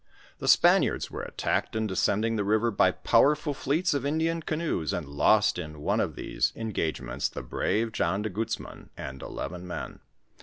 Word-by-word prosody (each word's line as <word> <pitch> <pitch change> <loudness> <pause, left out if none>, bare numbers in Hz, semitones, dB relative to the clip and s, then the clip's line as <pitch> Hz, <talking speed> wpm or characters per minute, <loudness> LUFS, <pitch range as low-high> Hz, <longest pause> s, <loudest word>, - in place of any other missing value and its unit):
The - - -4
Spaniards - - +4
were - - -5
attacked - - -2
in 110 0 0
de 100 - -3
Bcending 110 +4 +1
the 105 - 0
river 110 +3 +2
by 100 - +4
powerful 150 0 +3
fleets 155 +6 0
of 140 -3 -1
Indian 160 +3 0
canoes, 155 - -2
and 85 -5 -3
lost 100 +8 +3
in 75 -3 -7
one 75 - 0
of - - -1
these - - -1
engagements 80 - -2
the - - -7
brave 115 +2 -1
John 100 -2 0
de 110 - -2
Guzman 110 +4 -5
and 65 0 -7
eleven 90 +1 -6
men. 90 - -6
110 Hz, 175 wpm, -28 LUFS, 90-140 Hz, -, Spaniards